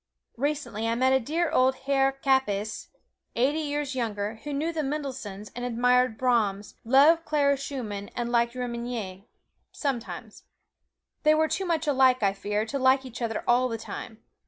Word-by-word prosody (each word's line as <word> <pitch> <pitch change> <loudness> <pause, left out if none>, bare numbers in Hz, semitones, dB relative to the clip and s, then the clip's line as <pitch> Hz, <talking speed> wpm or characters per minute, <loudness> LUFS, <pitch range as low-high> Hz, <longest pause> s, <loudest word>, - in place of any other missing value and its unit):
Recently 255 -5 -2
I 230 - +1
met 260 +1 +3
dear 325 +3 0
old 260 -3 +3
Herr 270 -1 +3
Kappes, 265 -6 0 0.5
eighty 275 +6 +2
years 290 -2 -2
young, 235 -5 -2
who 220 +7 -4
knew 310 +4 -1
the 320 - -1
Mendelssohns, 260 -9 -5
and 245 - -5
admired 245 0 +2
Brahms, 210 -5 0
loved 285 +7 +5
Clara 290 -3 +2
Schumann, 235 -8 -5
and 240 -1 -2
liked 235 0 +2
Remenyi 235 -5 -5 0.4
sometimes. 265 -6 -5 0.8
They 305 0 +5
were 315 0 +3
too 380 +3 -2
much 330 -2 0
alike, 260 -4 +4
I 195 -1 +3
fear, 205 +2 -2
to 275 +5 -3
like 260 +1 +4
each 250 -1 -9
other 225 -2 -2
all 250 +1 +4
the 230 - -3
time. 220 0 -8
255 Hz, 155 wpm, -27 LUFS, 225-280 Hz, 0.8 s, loved